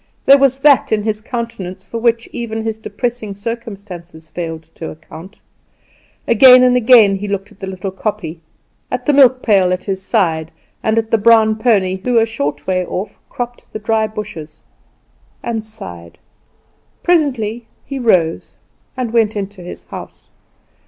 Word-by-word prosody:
There 275 +1 +7
was 270 0 +2
that 285 -2 +4
in 215 -1 +1
his 215 0 -2
countenance 210 -6 -6
for 230 +5 -5
which 230 0 +1
even 225 -2 -4
his 220 -1 -3
depressing 230 -3 -4
circumstances 200 -7 -8
failed 165 -2 -5
to 160 - -7
account. 160 +5 -12 0.9
Again 250 +2 +8
and 250 0 +4
again 225 -5 +6
he 205 +2 -5
looked 200 +1 -4
at - - -20
the 195 - -6
little 190 0 -5
kopje, 190 -4 -4 0.5
at - - -3
the 295 - +3
milk 260 -2 +5
pail 195 -5 +3
at 185 0 -2
his 190 -2 -3
side, 165 -7 0 0.3
and 220 0 0
at 225 0 0
the 225 - +3
brown 220 0 +5
pony, 205 -5 +1
who 245 -1 +1
a 225 - +5
short 150 -10 -4
way 185 -1 0
off 185 +3 -5
cropped 245 0 -6
the - - -3
dry 220 +1 0
bushes 200 -8 -8 0.8
and 225 -2 -3
sighed. 85 - -10 0.9
Presently 240 -9 0 0.2
he 275 -1 -5
rose 180 -9 +1 0.4
and 245 -3 -3
went 220 -2 +2
into 200 -1 -5
his 175 - -9
house. - - -10
215 Hz, 160 wpm, -17 LUFS, 185-235 Hz, 0.9 s, Again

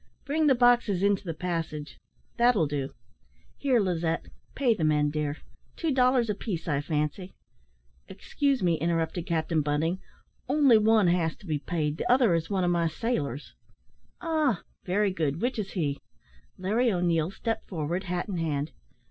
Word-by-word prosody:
"Bring 305 +2 +1
the 270 - +5
boxes 240 -6 +3
into 200 -1 +2
the 170 -4 -4
passage 160 -3 -4 0.4
that 240 +1 +4
will 165 - +3
do. 140 -2 -2 0.7
Here, 265 -4 +2
Lizette, 170 -4 0 0.3
pay 255 -4 +3
the 180 - -3
men, 150 -1 +2
dear; 150 -1 -2 0.4
two 325 -3 -1
dollars 255 -2 +3
a 210 - 0
piece, 195 -5 -5
I 145 -3 +1
fancy 150 +5 -3 0.4
" - - -38
"Excuse 280 -6 -1
me," 170 -3 +2
interrupted 165 +2 -1
Captain 160 -2 0
Bunting, 150 +5 0 0.5
"only 275 -5 +5
one 215 -1 +4
bas 170 -2 +2
to - - -18
be 155 -4 -1
paid, 150 -1 -2
the - - 0
other 245 -7 +5
is 165 -1 -1
one 195 -3 0
of 175 - +2
my 170 -1 +2
sailors." 155 - -3 0.7
"Ah! 310 - 0 0.2
very 200 +2 +1
good; 155 -4 -1
which 245 +1 -1
is 195 -2 -4
he?" 145 -6 -1 0.6
Larry 220 +6 +1
O'Neil 170 -3 +1
stepped 225 +4 -4
forward, 175 +2 -3
hat 180 +1 -2
in 195 -4 -3
hand. 155 -2 -2
175 Hz, 165 wpm, -27 LUFS, 155-225 Hz, 0.7 s, the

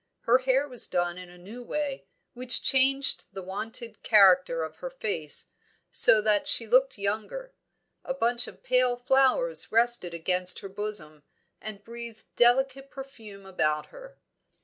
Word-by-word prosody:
Her 245 +2 +3
hair 265 +2 0
was 250 -4 +3
done 175 0 -2
in 180 -1 -12
a 180 - -16
new 205 +8 -12
way, 280 +2 -5 0.3
which 250 0 +1
changed 270 +1 +1
the 190 -1 -8
wonted 225 +5 -6
character 185 -6 +3
of 160 0 -8
her 265 - -7
face, 205 - -4 0.4
so 215 - +5
that 210 -1 0
she 230 - +6
looked 255 +3 +2
younger. 215 - -5 0.5
A 265 - -5
bunch 240 -1 -1
of - - -14
pale 250 -1 +1
flowers 270 - +1
rested 230 -6 +2
against 180 +2 +2
her 195 - -9
bosom, 195 -7 -6 0.4
and 210 -2 -9
breathed 235 -1 -11
delicate 265 +3 +1
perfume 225 -8 -12
about 155 -5 -2
her. - - -14
230 Hz, 150 wpm, -26 LUFS, 190-260 Hz, 0.5 s, she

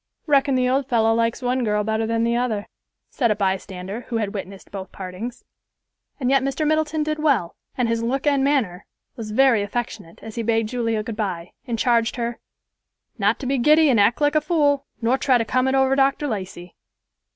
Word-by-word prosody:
"Reckon 280 -2 +3
the 255 -1 +2
old 265 +1 0
fellow 225 -3 +3
likes 230 +2 0
one 250 +1 0
girl 210 -1 +1
better 220 +1 -1
than 230 0 0
the 235 0 +1
other," 235 -4 -1 0.5
said 240 -4 +1
a 215 - +2
bystander, 190 +1 -3
who 235 - -2
had 210 -3 -2
witnessed 195 -1 -8
both 190 -2 -7
partings. 195 +6 -7 0.8
And 255 -1 0
yet 275 -1 +4
Mr. 275 +3 -1
Middleton 310 0 +1
did 305 0 -2
well, 275 - +1 0.2
and 250 -2 +1
his 230 0 0
look 260 +5 -1
and 280 -2 +3
manner 235 -11 0 0.3
was 225 -4 -7
very 235 0 +4
affectionate 205 -4 -5
as 225 - -8
he 235 - -3
bade 225 -1 +1
Julia 230 -2 -1
good 225 0 -5
bye, 185 -5 -4 0.2
and 235 -2 -2
charged 235 0 +2
her 235 -1 -3 0.8
"not 205 +2 +2
to - - -5
be 270 0 0
giddy 305 +3 +5
and 230 - +3
act 205 +4 +3
like 290 0 +3
a 310 - +3
fool, 290 -3 +1 0.2
nor 250 +4 +2
try 260 -3 +3
to 230 - -1
come 255 +3 +1
it 265 - +1
over 265 0 +3
Dr. 275 +2 +2
Lacey." 185 -6 -6
235 Hz, 205 wpm, -22 LUFS, 215-270 Hz, 0.8 s, giddy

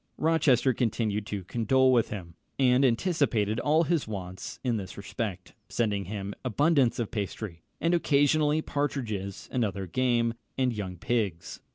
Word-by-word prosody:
Rochester 145 -5 +3
continued 110 -3 -1
to 100 -2 -4
condole 130 +6 +3
with 120 -3 +3
him, 90 -5 -7 0.2
and 130 0 +4
anticipated 120 - +1
all 155 +5 +3
his 165 -4 0
wants 95 -3 -6
in 120 -3 +1
this 95 -2 -7
respect, 100 -2 -5 0.2
sending 105 -4 0
him 100 +1 -5
abundance 135 +1 +2
of 115 -3 -2
pastry, 100 -4 -4 0.2
and 170 +1 +1
occasionally 150 -1 +3
partridges 115 -9 -3
and 125 - +1
other 100 -2 -2
game, 120 +3 +1 0.2
and 130 -2 +2
young 95 -4 -5
pigs. 90 -6 -2
115 Hz, 145 wpm, -28 LUFS, 100-135 Hz, 0.2 s, and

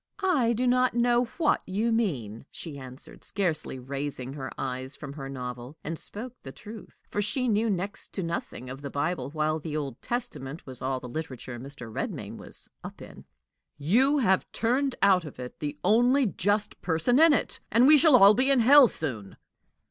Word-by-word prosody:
"I 270 -11 +3
do 245 +3 -1
not 250 0 +2
know 240 0 +3
what 320 -3 +2
you 210 +5 0
mean," 135 - -2
she 150 -4 -8
answered, 130 0 -11
scarcely 165 -9 -2
raising 135 0 -5
her 135 -2 -6
eyes 130 +1 -4
from 140 -2 -8
her 135 -2 -7
novel 125 +1 -7
and 165 +1 -4
spoke 240 +4 -7
the 135 - -9
truth, 215 +8 -12
for 205 - 0
she 250 +5 0
knew 220 0 +2
next 195 0 -3
to 190 - -3
nothing 165 -6 -5
of 135 +2 -8
the 140 - -5
Bible, 145 +3 -2
while 155 +1 -1
the 155 0 -4
Old 140 -5 -5
Testament 180 - -4
was 130 -2 -4
all 130 0 -1
the 125 - -9
literature 130 -3 -6
Mr. 130 -3 -9
Redmain - - -5
was - - -9 0.2
"up - - -9
in." - - -12 0.5
"You 240 - +3
have 190 -8 +2
turned 255 +3 0
out 190 -3 +5
of 150 - -10
it 125 0 -8
the 150 -1 -4
only 245 +7 +4
just 205 +1 -1
person 180 - +2
in 325 0 +7
it, 290 - 0
and 235 +4 +5
we 305 +3 +9
shall 310 -4 +6
all 200 -3 +8
be 255 +5 +2
in 270 -3 +4
hell 270 +3 +8
soon!" 115 - -5
170 Hz, 185 wpm, -27 LUFS, -, 0.5 s, we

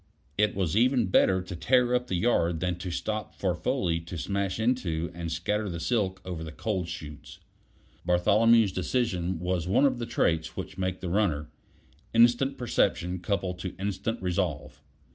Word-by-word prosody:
It 105 +1 +2
was 95 -3 0
even 120 -2 +3
better 95 -1 +4
to 90 -1 -7
tear 125 +6 +2
up 125 0 +1
the 95 - -1
yard 85 -5 +1
than 90 0 -2
to 90 - -5
stop 110 +5 -3
for - - 0
Foley 85 -1 0
to 85 +1 -8
smash 100 +2 -2
into 90 -9 0
and 85 -1 -5
scatter 105 +6 -1
the 85 -1 -4
silk 95 +1 0
over 90 -3 -5
the 80 - -7
coal 95 +1 -2
chutes. 75 -3 -9 0.6
Bartholomew's 105 +5 +4
decision 95 -3 -1
was 90 -1 -1
one 100 +9 +4
of 130 -3 +1
the 120 - -3
traits 80 -8 0
which 95 0 -6
make 95 0 -2
the 90 - -3
runner: 85 -6 0 0.6
instant 120 +4 +4
perception 90 -7 0
coupled 90 0 -2
to 90 0 -5
instant 100 +4 -3
resolve. 85 -6 -2
95 Hz, 165 wpm, -28 LUFS, 85-110 Hz, 0.6 s, better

